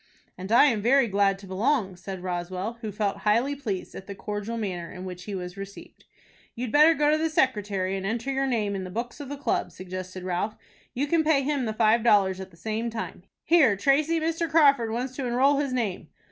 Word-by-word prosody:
"And 185 +3 -7
I 235 - +7
am 230 -8 +2
very 260 +3 +4
glad 200 -1 +2
to 195 - -13
belong," 195 +1 0
said 185 +1 -7
Roswell, 185 +5 -4
who 220 -3 -4
felt 205 -1 -1
highly 235 +7 +1
pleased 215 -10 -4
at 195 - -9
the 200 - -6
cordial 210 +3 -4
manner 180 -6 -4
in 185 0 -8
which 180 -1 -8
he 205 - -5
was 180 0 -6
received. 195 0 -10 0.5
"You'd 240 -1 -4
better 305 +3 +6
go 295 0 +3
to 310 - +2
the 320 +1 +1
secretary, 205 -10 0
and 190 - -4
enter 230 +6 -2
your 270 0 0
name 215 -5 0
in 190 - -3
the 185 - -6
books 235 +8 -5
of 285 -2 -7
the 285 - -5
club," 280 - -1
suggested 185 0 -7
Ralph. 185 +4 -2 0.4
"You 270 +4 0
can 320 +2 +2
pay 300 -3 +3
him 280 -2 0
the 220 - -1
five 220 +1 +3
dollars 195 -5 +4
at 190 0 -7
the 165 - -20
same 220 +5 -3
time. 220 -5 -6 0.2
Here, 305 -10 +5
Tracy, 295 +8 +2
Mr. 330 +1 -1
Crawford 280 -7 +4
wants 250 +3 -3
to 265 -3 -2
enroll 265 +4 +3
his 280 -2 -1
name." 215 -10 -2
220 Hz, 220 wpm, -26 LUFS, 190-275 Hz, 0.5 s, I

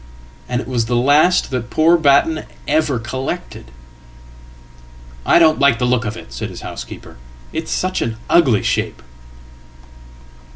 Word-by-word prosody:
And 125 -1 -1
it 115 - -10
was 120 -3 -1
the 120 - 0
last 145 +9 +3
that 120 -2 -3
poor 160 +5 +4
Batten 155 0 +2 0.2
ever 150 -3 +1 2.3
collected.""I - - +5
don't 160 -3 +4
like 140 -3 +4
the 125 - 0
look 125 -1 +1
of 110 +1 -4
it," 60 - -12
said - - -5
his - - -10
housekeeper. - - -9 0.4
"It's - - -4
such 185 0 -1
an 115 -1 -3
uglyshape."" 130 -12 +1
135 Hz, 130 wpm, -18 LUFS, 120-155 Hz, 2.3 s, collected.""I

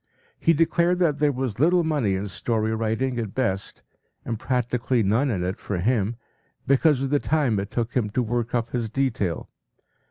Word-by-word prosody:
He 165 - +4
declared 170 +2 +2
that 160 -5 +1
there 150 -1 +3
was 125 -5 -3
little 175 +4 +4
money 145 -12 +1
in 100 +2 -3
story 110 +3 -1
writing 115 +3 -1
at 110 -4 -5
best, 100 -7 -2 0.4
and 115 -2 -3
practically 125 -1 0
none 115 +8 +2
in 95 -7 -1
it 90 +2 -3
for 100 - -3
him, 110 +3 +1 0.5
because 140 0 +3
of 135 0 -2
the 145 - +3
time 140 -10 +1
it 100 +1 -4
took 120 0 -2
him 115 -5 0
to 125 +4 0
work 120 +1 -2
up 120 -1 0
his 120 -3 -2
detail. 115 - -1
120 Hz, 185 wpm, -24 LUFS, 110-140 Hz, 0.5 s, He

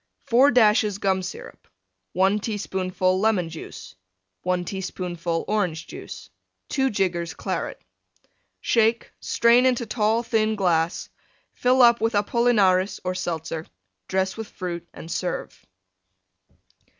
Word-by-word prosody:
4 255 +5 +5
dashes 215 -4 +4
Gum 190 -2 +1
Syrup. 185 - -9 0.5
1 190 +3 +2
teaspoonful 190 -3 -1
Lemon 200 -5 +1
Juice. 160 -1 -9 0.5
1 180 0 -1
teaspoonful 175 -3 -3
Orange 180 -7 -1
Juice. - - -10 0.4
2 265 -1 +1
jiggers 180 -5 -1
Claret. - - -4 0.8
Shake; 230 0 +2
strain 235 +2 +4
into 245 -2 +1
tall, 220 +1 +1
thin 220 -2 +1
glass; 170 -4 0 0.5
fill 250 +1 +3
up 235 -1 +6
with 225 -1 +1
Apollinaris 205 -3 +2
or 185 - -1
Seltzer; 165 -2 -4 0.4
dress 190 0 0
with 220 -1 -6
Fruit 175 -3 -6
and 165 - -10
serve. 180 - -4
195 Hz, 115 wpm, -24 LUFS, 180-225 Hz, 0.8 s, up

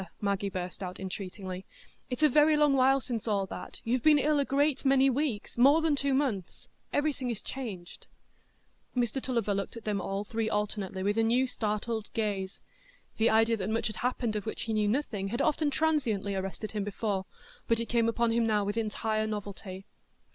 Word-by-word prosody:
Maggie 200 -1 0
burst 180 -1 -5
out 180 -1 -5
entreatingly; 190 0 -5 0.5
"it's 250 +4 -2
a - - +9
very 300 +2 +5
long 295 -2 +4
while 270 +1 +4
since 235 -3 -4
all 200 -3 +1
that; - - -8
you've 245 +2 0
been 305 +1 +6
ill 295 +1 +2
a 280 - +2
great 285 +1 +1
many 270 0 +5
weeks,—more 270 +1 +3
than 320 -2 +2
two 280 0 0
months; 240 -11 -2 0.2
everything 290 -3 0
is 230 -3 -2
changed." 200 -10 -7 0.9
Mr 245 +2 0
Tulliver 235 -6 0
looked 200 +3 -3
at 230 - -9
them 205 -2 -1
all 195 +2 -2
three 220 +1 -2
alternately 205 -3 -2
with 205 +3 +1
a 235 +3 +3
startled 220 -2 -3
gaze; 200 -3 -2 0.6
the 225 +1 +4
idea 225 +1 +4
that 195 0 -3
much 225 +1 0
had 215 - -3
happened 240 -3 -1
of 210 +1 -3
which - - -3
he 225 - -2
knew 210 -1 +2
nothing 215 -4 -1
had 235 +4 -3
often 305 -1 +2
transiently 265 -10 0
arrested 195 +2 -4
him 210 -2 -2
before, 200 -1 -2 0.4
but 230 0 +2
it 230 - -1
came 230 -1 +2
upon 235 0 +1
him 230 0 +2
now 210 -2 +2
with 205 +2 -2
entire 215 0 -1
novelty. 200 -2 -6
225 Hz, 185 wpm, -30 LUFS, 200-260 Hz, 0.9 s, a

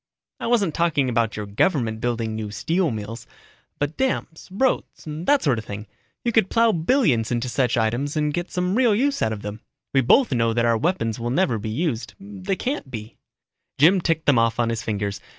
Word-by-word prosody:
"I - - -3
wasn't 210 -9 +2
talking 150 -6 +1
about 115 -3 0
your 105 - -3
government 110 - 0
building 115 -2 -1
new 110 -1 -4
steel 165 - 0
mills. 115 +1 -6 0.5
But 145 +2 -2
dams, 260 -11 -2
roads, 245 +7 -1
that 165 - +1
sort 130 -7 +2
of 110 - -9
thing. 105 0 -6 0.4
You 235 - +2
could 220 -4 +3
plow 230 -1 +4
billions 165 - +2
into 120 +1 -1
such 125 0 0
items 120 +7 0
and 150 -1 0
get 175 +2 -3
some 180 0 -1
real 235 -2 +3
use 275 +5 +1
out 110 - +1
of 105 -2 -5
them. 105 +1 -6 0.3
We 135 - +4
both 235 - +4
know 115 -2 +2
that 120 +1 +1
our 115 -1 +3
weapons 125 - -1
will 120 +1 -2
never 125 - +1
be 110 +1 -4
used 120 -2 -2
they 195 -1 -4
can't 255 - -3
be." 110 -2 -8 0.6
Jim 175 +6 +5
ticked 165 -2 0
them 140 -5 +4
off 115 0 +1
on 115 -1 +2
his 115 -1 -2
fingers. 100 -3 -3
135 Hz, 205 wpm, -23 LUFS, 115-185 Hz, 0.6 s, Jim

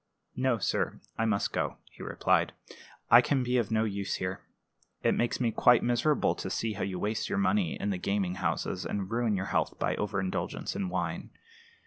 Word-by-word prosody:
"No, 130 -2 +2
sir; 100 - -1 0.2
I 115 - 0
must 110 -3 0
go," - - -1
he - - -14
replied. - - +1 0.6
"I 120 +1 +10
can 135 +1 +1
be 125 +1 +1
of 115 -5 +1
no 110 0 +2
use 100 -2 -2
here. 90 0 -3 0.6
It - - +4
makes 120 0 0
me 120 -3 +1
quite 125 +2 +5
miserable 120 +5 +2
to - - -4
see 110 -1 -1
how 105 - -6
you 95 -2 -2
waste 105 +3 -2
your 205 - -1
money 195 -1 +1
in 100 - -1
the 95 - -2
gaming 100 -1 0
houses, 90 +1 -1
and 95 +3 -3
ruin 115 -2 +1
your 95 0 -2
health - - 0
by - - 0
overindulgence 100 -3 -2
in 195 -2 -2
wine. - - -3
110 Hz, 190 wpm, -30 LUFS, 100-125 Hz, 0.6 s, I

